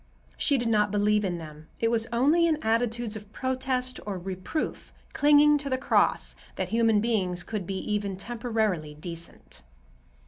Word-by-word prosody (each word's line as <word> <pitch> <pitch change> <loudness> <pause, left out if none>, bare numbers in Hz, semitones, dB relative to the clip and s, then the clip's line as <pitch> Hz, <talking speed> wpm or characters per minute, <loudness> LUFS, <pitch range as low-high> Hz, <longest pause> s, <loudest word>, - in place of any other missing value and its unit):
She 280 - +2
did 240 -2 -1
not 210 -2 +3
believe 210 +1 +2
in 180 -3 -1
them. 155 -1 -10
It 230 0 +1
was 225 -1 +1
only 295 +8 +4
in 315 -2 +2
attitudes 230 0 0
of 210 -1 -9
protest 255 0 -1
or 200 -2 -4
reproof, 185 - -4 0.2
clinging 295 0 +5
to 280 -1 -4
the 260 - +1
cross, 260 - +1 0.2
that - - -3
human 225 -2 +3
beings 185 -6 0
could 200 -3 -5
be 195 - -3
even 200 -1 -2
temporarily 220 -9 -2
decent. 165 +2 -9
220 Hz, 160 wpm, -27 LUFS, 190-250 Hz, 0.2 s, clinging